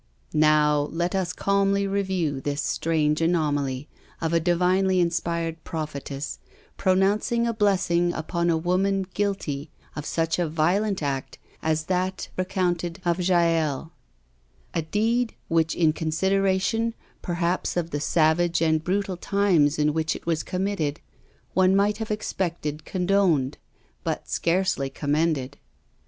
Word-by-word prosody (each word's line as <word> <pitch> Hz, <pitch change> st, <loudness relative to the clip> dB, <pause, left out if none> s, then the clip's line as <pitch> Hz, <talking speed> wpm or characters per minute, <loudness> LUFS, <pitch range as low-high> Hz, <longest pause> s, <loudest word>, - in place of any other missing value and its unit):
" 65 Hz, -, -32 dB
Now, 150 Hz, -1 st, +4 dB
let 175 Hz, +2 st, -1 dB
us 190 Hz, -2 st, 0 dB
calmly 200 Hz, +1 st, +1 dB
review 190 Hz, -8 st, -1 dB
this 145 Hz, +1 st, -2 dB
strange 155 Hz, -1 st, +1 dB
anomaly 145 Hz, -5 st, 0 dB, 0.3 s
of 165 Hz, 0 st, -1 dB
a 170 Hz, -, +4 dB
divinely 180 Hz, +2 st, +2 dB
inspired 170 Hz, -1 st, -1 dB
prophetess, 150 Hz, -3 st, -5 dB, 0.4 s
pronouncing 200 Hz, +5 st, +2 dB
a 235 Hz, -, 0 dB
blessing 190 Hz, -5 st, +2 dB
upon 170 Hz, +1 st, -1 dB
a 165 Hz, -, +3 dB
woman 190 Hz, +3 st, +1 dB
guilty 165 Hz, -8 st, -2 dB, 0.3 s
of 150 Hz, -1 st, -5 dB
such 165 Hz, +1 st, 0 dB
a 170 Hz, -3 st, 0 dB
violent 180 Hz, +5 st, +1 dB
act 135 Hz, -2 st, -3 dB, 0.2 s
as 160 Hz, 0 st, 0 dB
that 185 Hz, +2 st, -2 dB
recounted 180 Hz, -2 st, -1 dB
of 175 Hz, +1 st, +1 dB
Jael 165 Hz, -4 st, +1 dB, 0.4 s
— -, -, -37 dB
^a 160 Hz, -1 st, -2 dB
deed, 230 Hz, +5 st, +1 dB
which 165 Hz, -1 st, +2 dB
in 160 Hz, -3 st, +3 dB
consideration 195 Hz, +7 st, +1 dB, 0.3 s
per 175 Hz, -, -3 dB
haps 175 Hz, +1 st, -1 dB
of 170 Hz, -1 st, -1 dB
the 145 Hz, -, -2 dB
savage 165 Hz, +2 st, +2 dB
and 160 Hz, -1 st, +2 dB
brutal 190 Hz, +1 st, -1 dB
times 180 Hz, -7 st, +2 dB
in 150 Hz, 0 st, +2 dB
which 160 Hz, 0 st, 0 dB
it -, -, -9 dB
was 165 Hz, -2 st, 0 dB
conunitted, 180 Hz, -6 st, -2 dB, 0.6 s
one 185 Hz, 0 st, +4 dB
might 205 Hz, +1 st, +2 dB
have 220 Hz, -, -4 dB
expected 170 Hz, -7 st, -3 dB
condoned, 180 Hz, -7 st, +1 dB, 0.4 s
but -, -, -3 dB
scarcely 170 Hz, -5 st, 0 dB
commended. 145 Hz, -2 st, -1 dB
170 Hz, 135 wpm, -25 LUFS, 155-190 Hz, 0.6 s, Now